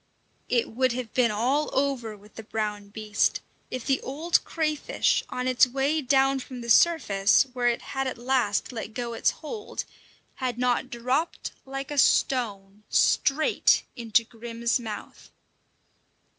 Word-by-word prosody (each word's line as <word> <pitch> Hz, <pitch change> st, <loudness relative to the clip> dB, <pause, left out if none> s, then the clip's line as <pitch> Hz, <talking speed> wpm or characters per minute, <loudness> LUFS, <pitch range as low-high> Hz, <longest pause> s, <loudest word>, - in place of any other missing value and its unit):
It 240 Hz, -2 st, +1 dB
would 255 Hz, +2 st, +1 dB
have 245 Hz, -3 st, -5 dB
been 250 Hz, -2 st, +3 dB
all 250 Hz, +8 st, 0 dB
over 260 Hz, -6 st, -1 dB
with 210 Hz, +1 st, -19 dB
the -, -, -8 dB
brown 210 Hz, -2 st, -4 dB
beast 210 Hz, 0 st, 0 dB, 0.3 s
if 255 Hz, -2 st, -5 dB
the 270 Hz, -1 st, +1 dB
old 315 Hz, +6 st, 0 dB
crayfish, 305 Hz, -2 st, 0 dB
on 250 Hz, 0 st, -3 dB
its 255 Hz, 0 st, +5 dB
way 275 Hz, +5 st, 0 dB
down 270 Hz, 0 st, +3 dB
from 255 Hz, -1 st, -8 dB
the 235 Hz, 0 st, -2 dB
surface, 215 Hz, -12 st, +4 dB
where 245 Hz, -1 st, 0 dB
it 240 Hz, -1 st, 0 dB
had 270 Hz, -1 st, -1 dB
at 260 Hz, -, -4 dB
last 245 Hz, -4 st, 0 dB
let 225 Hz, -2 st, -7 dB
go 240 Hz, -2 st, -3 dB
its -, -, +2 dB
hold, 415 Hz, +8 st, -6 dB, 0.5 s
had 250 Hz, -3 st, -2 dB
not 250 Hz, +1 st, 0 dB
dropped 260 Hz, +6 st, -2 dB, 0.2 s
like 270 Hz, +1 st, -5 dB
a 290 Hz, -, 0 dB
stone 205 Hz, -8 st, +1 dB
straight 300 Hz, +3 st, +3 dB
into 230 Hz, -1 st, +2 dB
Grim's 235 Hz, +1 st, -2 dB
mouth. 220 Hz, -3 st, -8 dB
250 Hz, 145 wpm, -26 LUFS, 225-270 Hz, 0.5 s, its